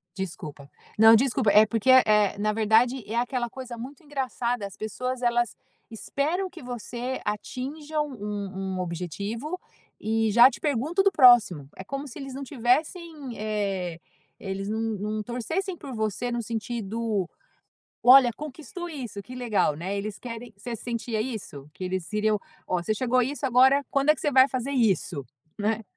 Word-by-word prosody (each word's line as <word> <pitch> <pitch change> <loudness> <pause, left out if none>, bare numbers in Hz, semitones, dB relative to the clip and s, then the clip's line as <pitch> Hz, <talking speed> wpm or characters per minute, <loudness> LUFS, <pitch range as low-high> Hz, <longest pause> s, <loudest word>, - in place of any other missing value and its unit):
Desculpa. 155 -7 -6 0.3
Não, 225 +1 +9
desculpa, 245 -2 +2
é 210 +2 +7
porque 225 +3 -1
é 260 - +9
é, 210 -2 +3
na 210 +1 +1
verdade, 225 +3 +3
é 220 - -4
aquela 240 0 -1
coisa 250 -2 -8
muito 265 +6 -9
engraçada, 250 -5 -2
as 200 - -8
pessoas 250 +4 -4
elas 240 -2 +1 0.4
esperam 315 - -2
que 350 -5 -12
você 245 +1 -5
atinja 285 +9 -4
um 200 -7 -4
um - - -3
objetivo 200 - -4 0.4
e 220 0 +1
já 240 +4 +8
te - - -9
pergunto 300 +6 +1
do 395 - +4
próximo. 235 - +6
É 190 - -8
como 275 +7 -5
se 275 - -9
eles 270 -1 -7
não 275 - -5
tivessem, 285 +2 -1
eh, 195 -5 -2 0.4
eles 195 0 -4
não 220 - -1
não 215 -1 -2
torcessem 320 - -3
por 280 -4 -8
você 220 +2 -2
no 240 0 -1
sentido: 225 -3 -3 0.7
"Olha, 255 -1 +8
conquistou 315 +4 -7
isso. 240 - -6
Que 250 - -10
legal", 235 -11 +1
né, 180 +6 -4
eles 205 +1 -4
querem 230 -1 -8
você 230 +4 -6
sentia 230 -1 -3
isso? 215 - -6
Que 185 - -7
eles 185 -2 -2
queriam: 215 0 +1 0.3
"Ó, 180 -1 -1
você 215 +5 0
chegou 250 +2 +2
isso 280 +3 -2
agora, 265 +3 +5
quando 275 +2 +3
é 305 - +6
que - - -11
você 295 - +1
vai 260 +1 +7
fazer 260 +1 -3
isso?", 195 - +1 0.3
né. 220 +2 0
235 Hz, 165 wpm, -26 LUFS, 210-265 Hz, 0.7 s, Não